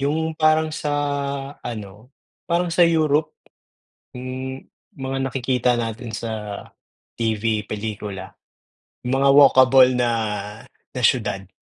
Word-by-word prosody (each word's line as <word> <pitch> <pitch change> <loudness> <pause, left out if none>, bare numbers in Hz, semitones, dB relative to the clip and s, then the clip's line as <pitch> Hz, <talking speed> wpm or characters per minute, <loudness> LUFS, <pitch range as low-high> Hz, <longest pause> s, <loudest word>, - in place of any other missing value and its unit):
Yung 160 +3 -1
parang 155 0 +3
sa 150 -1 -3 0.7
ano, 110 +2 -8 0.3
parang 175 +1 0
sa 170 +1 +4
Europe? 155 -2 +2 0.8
Yung 130 +1 -6 0.3
mga 135 -1 -4
nakikita 125 -1 0
natin 115 -1 -4
sa 115 - -5 0.8
TV, 110 -2 -1
pelikula, 105 -2 -5 0.8
mga 135 +2 +2
walkable 130 -2 +6
na 120 -1 +1 0.8
na 125 - -5
siyudad. 105 -5 +1
130 Hz, 100 wpm, -22 LUFS, 110-145 Hz, 0.8 s, walkable